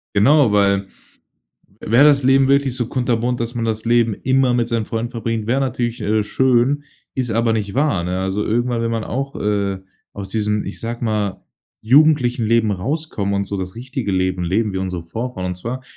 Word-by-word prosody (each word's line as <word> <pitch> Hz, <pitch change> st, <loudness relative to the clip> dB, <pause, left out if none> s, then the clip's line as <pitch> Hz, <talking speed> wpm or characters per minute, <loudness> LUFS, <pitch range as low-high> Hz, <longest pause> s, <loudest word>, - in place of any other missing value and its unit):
Genau, 130 Hz, +4 st, +5 dB
weil, 100 Hz, -1 st, +2 dB, 0.9 s
wäre 120 Hz, +6 st, +4 dB
das 145 Hz, -2 st, +5 dB
Leben 135 Hz, +1 st, +4 dB
wirklich 140 Hz, -2 st, +2 dB
so 120 Hz, -2 st, -1 dB
kunterbunt, 125 Hz, -1 st, -1 dB
dass 120 Hz, +1 st, -3 dB
man 115 Hz, -, -1 dB
das 110 Hz, -1 st, -2 dB
Leben 115 Hz, -2 st, +2 dB
immer 130 Hz, +2 st, +1 dB
mit 120 Hz, -1 st, 0 dB
seinen 115 Hz, -2 st, -1 dB
Freunden 115 Hz, 0 st, -3 dB
verbringt, 115 Hz, -3 st, -3 dB
wäre 130 Hz, +3 st, +2 dB
natürlich, 120 Hz, -3 st, -2 dB
äh, 105 Hz, +1 st, +1 dB
schön. 130 Hz, +5 st, +1 dB, 0.3 s
Ist 125 Hz, -3 st, -2 dB
aber 115 Hz, +1 st, +1 dB
nicht 105 Hz, -3 st, -2 dB
wahr, 140 Hz, -, +1 dB
ne? 90 Hz, +1 st, -2 dB
Also 95 Hz, +2 st, -1 dB
irgendwann 120 Hz, +1 st, 0 dB
will 115 Hz, -, -1 dB
man 115 Hz, -1 st, -2 dB
auch, 135 Hz, +3 st, -4 dB
äh, 100 Hz, -2 st, 0 dB, 0.3 s
aus 100 Hz, -1 st, -7 dB
diesem, 105 Hz, -1 st, -1 dB
ich 95 Hz, -, -7 dB
sage 120 Hz, +1 st, -4 dB
mal, 105 Hz, -3 st, -2 dB, 0.4 s
jugendlichem 130 Hz, -2 st, +4 dB
Leben 115 Hz, -1 st, +2 dB
rauskommen, 105 Hz, -, -2 dB
und 100 Hz, 0 st, 0 dB
so 100 Hz, 0 st, -4 dB
das 95 Hz, 0 st, -5 dB
richtige 125 Hz, -3 st, -4 dB
Leben 95 Hz, -1 st, 0 dB
leben, 105 Hz, +4 st, 0 dB
wie -, -, -4 dB
unsere 90 Hz, -2 st, -3 dB
Vorfahren 100 Hz, +3 st, -5 dB
und 90 Hz, -1 st, -3 dB
zwar, 120 Hz, +8 st, -5 dB
115 Hz, 190 wpm, -19 LUFS, 100-125 Hz, 0.9 s, Genau